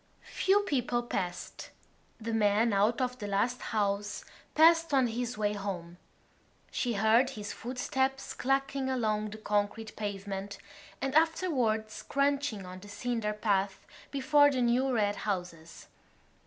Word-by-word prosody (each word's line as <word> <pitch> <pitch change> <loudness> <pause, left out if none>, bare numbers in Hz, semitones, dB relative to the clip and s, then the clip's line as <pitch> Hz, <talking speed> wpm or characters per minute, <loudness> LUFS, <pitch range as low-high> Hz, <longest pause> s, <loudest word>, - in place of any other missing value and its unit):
Few 390 +2 +3
people 250 - 0
passed. 180 -6 -4 0.5
The 225 0 -4
man 215 +1 +3
out 210 +4 +2
of 250 0 -2
the 205 - -4
last 205 +5 0
house 205 -1 -1 0.3
passed 330 -1 +5
on 265 -2 +4
his 240 0 -3
way 210 -1 +1
home; 180 -4 -5 0.7
she 245 -2 -1
heard 220 +5 +4
his 210 -6 -6
footsteps 265 +2 -2
clacking 270 0 0
along 215 -4 0
the 215 - -8
concrete 210 +1 -2
pavement 200 -1 -4 0.5
and 270 0 -1
afterwards 275 -10 +1
crunching 280 -7 0
on 185 0 -8
the 205 +2 -12
cinder 225 -1 -2
path 200 -2 0 0.2
before 290 +1 +4
the 260 -3 0
new 250 +3 +2
red 205 -4 +1
houses. 180 -5 -5
225 Hz, 130 wpm, -30 LUFS, 205-265 Hz, 0.7 s, passed